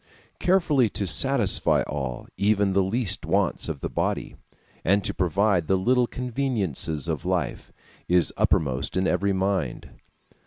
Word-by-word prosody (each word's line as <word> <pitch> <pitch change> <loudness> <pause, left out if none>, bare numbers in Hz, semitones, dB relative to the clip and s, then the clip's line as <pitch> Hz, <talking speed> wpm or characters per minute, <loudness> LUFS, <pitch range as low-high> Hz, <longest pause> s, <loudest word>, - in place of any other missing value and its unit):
Carefully 155 - +2
to 100 - -2
satisfy 105 - +3
all, 65 -4 -5
even 100 -1 +2
the 100 +1 +2
least 95 0 0
wants - - 0
of 75 -4 -5
the - - -2
body, - - -2 0.5
and 100 +3 +2
to - - 0
provide 95 -1 +1
the 95 - +2
little 125 +5 +2
conveniences 115 - -2
of - - -3
life, - - -2 0.4
is 90 0 +2
uppermost 65 +2 0
in 95 - +1
every 100 +1 +1
mind. 95 0 -2
100 Hz, 140 wpm, -25 LUFS, 90-120 Hz, 0.5 s, satisfy